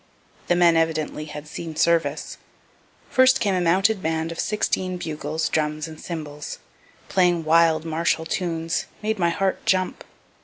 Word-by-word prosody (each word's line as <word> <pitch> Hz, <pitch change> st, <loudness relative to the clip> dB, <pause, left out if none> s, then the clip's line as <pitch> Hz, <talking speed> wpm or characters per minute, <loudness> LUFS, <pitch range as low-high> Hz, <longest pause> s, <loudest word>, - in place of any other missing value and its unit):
The 175 Hz, -, +3 dB
men 170 Hz, -2 st, +5 dB
evidently 155 Hz, -2 st, -1 dB
had 150 Hz, 0 st, -8 dB
seen 160 Hz, 0 st, -7 dB
service. 160 Hz, -2 st, +1 dB, 0.7 s
First 260 Hz, 0 st, +5 dB
came 205 Hz, -4 st, +1 dB
a 180 Hz, -, +1 dB
mounted 190 Hz, +4 st, +2 dB
band 160 Hz, 0 st, -1 dB
of 165 Hz, -, -7 dB
sixteen 185 Hz, -3 st, -1 dB
bugles, 155 Hz, -1 st, -3 dB
drums 155 Hz, 0 st, -1 dB
and 155 Hz, -1 st, -11 dB
cymbals, 150 Hz, -4 st, -6 dB, 0.5 s
playing 175 Hz, -3 st, +2 dB
wild 160 Hz, 0 st, +4 dB
martial 160 Hz, 0 st, 0 dB
tunes 165 Hz, -1 st, -2 dB, 0.2 s
made 215 Hz, -1 st, -1 dB
my 170 Hz, -1 st, +3 dB
heart 190 Hz, +2 st, -1 dB
jump. 185 Hz, -1 st, 0 dB
165 Hz, 145 wpm, -23 LUFS, 155-180 Hz, 0.7 s, men